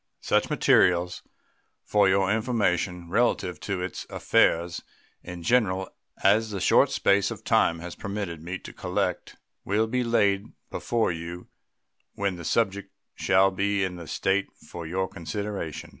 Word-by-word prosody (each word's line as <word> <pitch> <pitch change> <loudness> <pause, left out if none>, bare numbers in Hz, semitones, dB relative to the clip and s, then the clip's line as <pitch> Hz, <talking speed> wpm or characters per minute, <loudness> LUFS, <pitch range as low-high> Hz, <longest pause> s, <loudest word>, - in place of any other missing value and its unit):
Such - - +1
materials, 90 0 +3 0.6
for 100 -2 +3
your 95 0 +2
information, 100 -6 0
relative 100 -5 +1
to 95 -3 -3
its 95 - -6
affairs 85 +1 +2 0.4
in 90 -1 -8
general 95 -4 +1 0.3
as 110 +3 +4
the 100 -2 -4
short - - +4
space 100 0 +2
of - - -7
time 85 - +3
has 90 0 -6
permitted 100 -6 -5
me 90 +3 -5
to - - -11
collect - - -2 0.3
will 105 +3 +1
be 125 +3 -1
laid 100 -4 +1 0.2
before 115 -5 0
you 85 +2 -7 0.7
when 100 -2 -1
the 85 - -8
subject 100 +2 0 0.2
shall 95 +1 +3
be 100 +1 0
in 90 -2 -3
a 85 - -9
state 95 +1 0
for 85 -2 -9
your 95 +3 -1
consideration. 90 -1 -5
95 Hz, 145 wpm, -26 LUFS, 90-100 Hz, 0.7 s, as